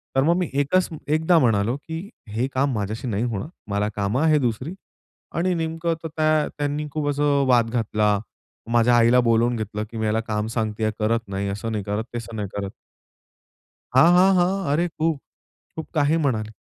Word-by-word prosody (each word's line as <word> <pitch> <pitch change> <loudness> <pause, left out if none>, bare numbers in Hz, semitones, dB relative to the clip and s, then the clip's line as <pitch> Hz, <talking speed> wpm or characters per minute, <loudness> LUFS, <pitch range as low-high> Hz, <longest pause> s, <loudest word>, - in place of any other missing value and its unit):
तर 135 - +4
मग 170 +2 +3
मी 180 -3 -1
एकच 180 +6 +2 0.2
एकदा 160 +3 +3
म्हणालो, 115 -3 +2
की 160 +7 -7 0.2
"हे 115 +5 -1
काम 135 +1 +1
माझ्याशी 110 +4 -3
नाही 105 -1 -1
होणार, 115 +2 -3 0.2
मला 100 +1 0
कामं 105 +7 0
आहेत 155 -2 +4
दुसरी." 130 - -2 0.6
आणि 180 +2 +1
नेमकं 165 0 -1
तर 160 - -4
काय 155 -1 +2
त्यांनी 145 +1 -2
खूप 150 -1 -1
असं 145 -1 +2
वाद 120 -3 +4
घातला. 105 -3 +1 0.5
माझ्या 120 +1 +4
आईला 120 +2 +5
बोलावून 115 +1 +3
घेतले, 105 0 -4
की 115 +1 -11
"मी 110 - -3
ह्याला 110 +1 +1
काम 105 -1 -2
सांगतेय, 110 -1 0
करत 115 0 0
नाही, 100 +1 -3
असं 105 +3 -4
नाही 105 -3 -3
करत, 105 +2 -2
तसं 115 -1 -6
नाही 105 -2 -3
करत." 100 -1 -3 1.2
हां, 155 +7 +7
हां, 190 +1 +5
हां. 185 +2 +1
अरे 170 +4 +2
खूप. 160 -3 -1 0.6
खूप 160 - -5
काही 150 0 +3
म्हणाली. 120 -9 0
125 Hz, 180 wpm, -23 LUFS, 110-155 Hz, 1.2 s, हां